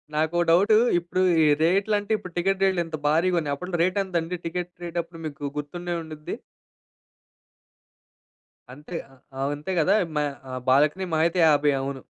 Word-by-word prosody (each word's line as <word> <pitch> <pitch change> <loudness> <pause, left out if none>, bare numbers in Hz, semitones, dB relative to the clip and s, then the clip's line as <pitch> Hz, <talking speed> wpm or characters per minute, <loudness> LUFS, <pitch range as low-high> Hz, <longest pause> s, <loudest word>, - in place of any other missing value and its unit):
నాకో 160 +3 +1
డౌటూ 200 +6 +5 0.2
ఇప్పుడు 175 +2 -2 0.2
ఈ - - +4 0.2
రేట్లంటే 200 +5 +1
ఇప్పుడు 180 -3 -11
టికెట్ 195 +2 0
రేట్లు 190 -2 +2
ఇంత 160 -1 -5
భారీగా 170 +4 +2
ఉన్నాయి. 145 -3 -2
అప్పట్లో 180 +4 -4
రేట్ 185 +2 0
ఎంతండి? 175 -1 -2
టికెట్ 175 +1 -3
రేట్ 170 0 -6
అప్పుడు 165 0 -14
మీకు 145 -1 -10
గుర్తుండే 175 +4 -4
ఉండుద్ది. 155 -1 -7 2.4
అంతే! 150 +6 -10 0.5
అవ్ 140 +1 0
అంతే 150 +6 -6
గదా! 185 +6 +3 0.2
మ - - 0 0.5
బాల్కనీ 150 +8 +3
మహా 160 0 +3
అయితే 170 +2 -2
50 145 -1 +4
అవును. 135 0 -4
170 Hz, 150 wpm, -25 LUFS, 150-185 Hz, 2.4 s, డౌటూ